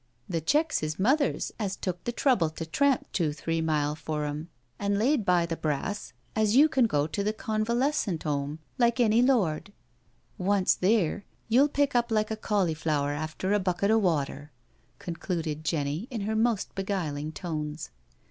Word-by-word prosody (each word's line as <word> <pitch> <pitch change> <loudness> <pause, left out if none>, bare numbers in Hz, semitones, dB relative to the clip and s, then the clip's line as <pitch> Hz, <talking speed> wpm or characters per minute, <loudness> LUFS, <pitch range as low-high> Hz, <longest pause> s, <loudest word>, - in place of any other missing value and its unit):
The 165 -3 -2
checks 300 - +2
is 155 0 -3
mother's, 270 +8 +1
as 200 -3 -2
took 180 -3 -4
the 240 - 0
trouble 240 - +2
to 160 +1 -6
tramp 270 - +2
two 160 -5 0
three 165 +2 -2
mile 150 -2 +1
for 155 -1 -3
'em, 150 +3 -5 0.3
an' 200 0 0
laid 245 +3 +2
by 180 -3 +3
the 165 0 -3
brass 155 +7 -2
so - - -19 0.2
as 215 0 +3
you 290 +4 +8
can 265 -6 +3
go 145 -8 +1
to 200 +6 -2
the 210 - +1
Convalescent 220 - -1
*Ome 145 0 -2 0.2
like 235 0 +3
any 230 -1 +4
lord. 205 -9 +1 0.7
Once 195 0 +3
theer, 200 -1 +1 0.3
you'll 265 +6 +5
pick 285 0 +1
up 240 -1 +2
likd 215 -1 +1
a - - 0
cauliflower 160 -9 0
after 155 +6 -2
a 210 - +3
bucket 185 +2 +1
o' 225 - +5
water," 150 -5 -1 0.5
con 170 -2 -6
cluded 160 -4 -3
Jenny 150 - -1
in 230 -5 -4
her 215 +2 -1
most 225 -2 +1
beguiling 160 -7 -3
tones. 155 -3 -5
185 Hz, 175 wpm, -28 LUFS, 155-225 Hz, 0.7 s, you